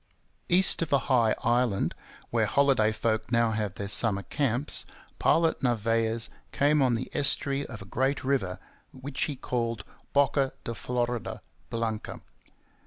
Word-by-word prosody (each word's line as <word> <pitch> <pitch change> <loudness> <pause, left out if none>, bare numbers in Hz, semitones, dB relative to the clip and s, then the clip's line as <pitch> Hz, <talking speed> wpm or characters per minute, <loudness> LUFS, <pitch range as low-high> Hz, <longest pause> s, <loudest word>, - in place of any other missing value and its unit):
East 180 0 +5
of 165 - -2
a 140 - +6 0.2
high 115 -3 +4
island, 120 -3 +1 0.4
where - - +2
holiday 135 -6 +3
folk 110 +1 -1
now 115 -1 +3
have 105 -3 -2
their 100 - -4
summer 100 -1 +2
camps, 140 +2 -1 0.4
Pilot 165 0 +3
Narvaez 115 -1 +1 0.2
came 145 +1 +3
on 125 -3 +3
the 120 - -4
estuary 140 0 0
of 115 -5 -8
a - - -13
great 130 +7 -1
river, 110 -9 0 0.3
which 135 +1 -3
he 145 - -4
called 115 -3 -2 0.3
Boca 140 -1 +2
de 115 - -4
Florida 120 +1 -2 0.3
Blanca. 115 -2 -3
120 Hz, 140 wpm, -28 LUFS, 110-140 Hz, 0.4 s, a